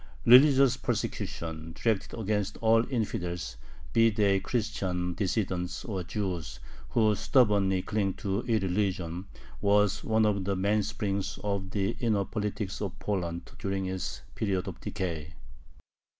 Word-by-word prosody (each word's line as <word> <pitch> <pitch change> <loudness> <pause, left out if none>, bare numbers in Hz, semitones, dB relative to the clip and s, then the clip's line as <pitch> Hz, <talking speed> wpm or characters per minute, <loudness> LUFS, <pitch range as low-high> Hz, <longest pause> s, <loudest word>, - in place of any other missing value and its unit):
Religious 135 0 +7
persecution, 80 -9 -3
directed 115 0 0
against 105 -2 -1
all 115 0 +4
"infidels," 90 - -2 0.4
be 115 -1 +6
they 100 -3 +2
Christian 95 -5 -2
dissidents 90 -2 -2
or 100 -5 -3
Jews 90 -7 -4 0.3
"who 110 -2 +3
stubbornly 100 -5 +3
cling 100 -3 -1
to 100 +2 -2
irreligion," 95 -4 0 0.4
was 105 0 +3
one 110 0 +3
of 100 -2 +1
the 100 +1 0
mainsprings 100 0 -1
of 100 -2 -2
the 100 +1 0
inner 105 -5 +1
politics 105 -2 -3
of 100 -4 -4
Poland 85 -4 -3
during 95 -1 -2
its 95 -1 -4
period 95 -4 -1
of - - -7
decay. 85 -6 -4
100 Hz, 120 wpm, -29 LUFS, 90-110 Hz, 0.4 s, Religious